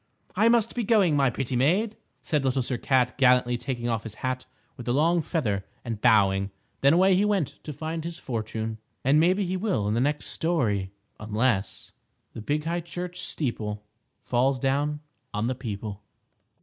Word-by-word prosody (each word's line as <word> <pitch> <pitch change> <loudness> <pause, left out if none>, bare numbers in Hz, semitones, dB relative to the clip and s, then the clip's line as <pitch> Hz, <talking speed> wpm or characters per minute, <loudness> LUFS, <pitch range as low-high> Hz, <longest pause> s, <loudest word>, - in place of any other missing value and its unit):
"I 225 - +4
must 230 -1 +3
be 240 - -1
going, 200 -8 +4
my 135 -2 +4
pretty 125 +1 -3
maid," 185 - +2 0.3
said 150 -3 0
Little 130 -1 +1
Sir 125 0 -3
Cat, 130 -1 +1
gallantly 125 -2 +4
taking 120 -1 -3
off 115 -3 0
his 110 -2 -8
hat 130 0 -2 0.3
with 125 -3 -10
the 120 - +1
long 165 +4 +3
feather 110 - -1 0.2
and 115 -3 -4
bowing. 100 -4 +4 0.3
Then 140 +2 +5
away 190 +3 +5
he 195 - +3
went 200 -8 -1
to 150 - -5
find 160 +3 -4
his 170 0 -5
fortune. 110 -2 -4 0.2
And 140 +4 +4
maybe 185 +5 +3
he 185 +1 -1
will 185 - 0
in 105 - +1
the 115 - +1
next 145 +2 0
story, 115 - 0 0.3
unless 105 -1 -1 0.4
_The 110 - -6
big 150 +5 0
high 170 +2 -1
church 175 +1 -6
steeple 110 -11 -3 0.4
Falls 130 +2 +2
down 145 +3 0 0.3
on 105 +2 0
the 125 - 0
people. 105 -4 -6
135 Hz, 175 wpm, -26 LUFS, 115-165 Hz, 0.4 s, Then